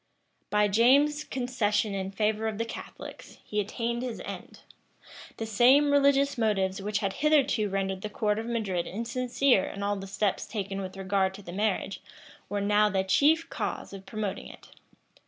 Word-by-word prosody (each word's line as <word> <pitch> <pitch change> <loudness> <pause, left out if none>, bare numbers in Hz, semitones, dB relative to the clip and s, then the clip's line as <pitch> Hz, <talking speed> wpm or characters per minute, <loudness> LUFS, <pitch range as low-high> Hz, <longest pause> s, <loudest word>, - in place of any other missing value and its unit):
By 210 0 +3
James's 275 +8 +4
concession 220 -6 -1
in 190 -1 -3
favor 215 +2 0
of 220 -2 -3
the 230 - -1
Catholics, 230 - -9
he 210 - -3
attained 230 +3 -2
his 250 -3 -4
end. - - -8 0.8
The 225 - -3
same 255 +7 +5
religious 280 -1 +3
motives 195 -3 +1
which 205 +1 -1
had 195 -2 -1
hitherto 280 -8 +3
rendered 195 -1 -2
the 215 - -4
court 210 0 0
of 225 - -5
Madrid 205 -7 -1
insincere 240 +1 +1
in 200 - -6
all 205 0 0
the 195 0 -7
steps 200 0 -1
taken 195 -2 -4
with 190 0 -7
regard 190 0 0
to 205 - -11
the 175 - -8
marriage, 200 -1 -1 0.5
were 205 0 -1
now 210 +1 +3
the 190 -1 0
chief 310 +11 +3
cause - - -4
of 195 -1 -10
promoting 210 -3 -4
it. - - -14
210 Hz, 170 wpm, -28 LUFS, 195-240 Hz, 0.8 s, same